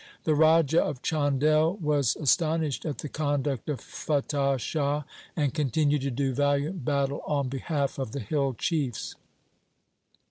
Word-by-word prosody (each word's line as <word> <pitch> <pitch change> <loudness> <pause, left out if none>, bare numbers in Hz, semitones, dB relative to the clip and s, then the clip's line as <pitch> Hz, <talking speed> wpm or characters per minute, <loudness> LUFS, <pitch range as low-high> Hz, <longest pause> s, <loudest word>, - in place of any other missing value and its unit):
The 155 - +2
Raja 160 0 +4
of 135 -4 -4
Chandel 155 +2 +2
was 145 -6 +1
astonished 160 0 +1
at 150 - -3
the - - -5
conduct 145 -3 -2
of 145 - -2
Fatah 140 -2 -1
Shah, 145 +4 -1 0.3
and 145 -5 0
continued 150 0 +1
to 140 - -1
do 135 +1 -1
valiant 145 +4 0
battle 140 +1 0
on 140 -3 0
behalf 140 +1 -2
of 130 -5 -3
the 140 - -4
hill 135 +3 -1
chiefs. 140 - -2
145 Hz, 140 wpm, -27 LUFS, 135-155 Hz, 0.3 s, Raja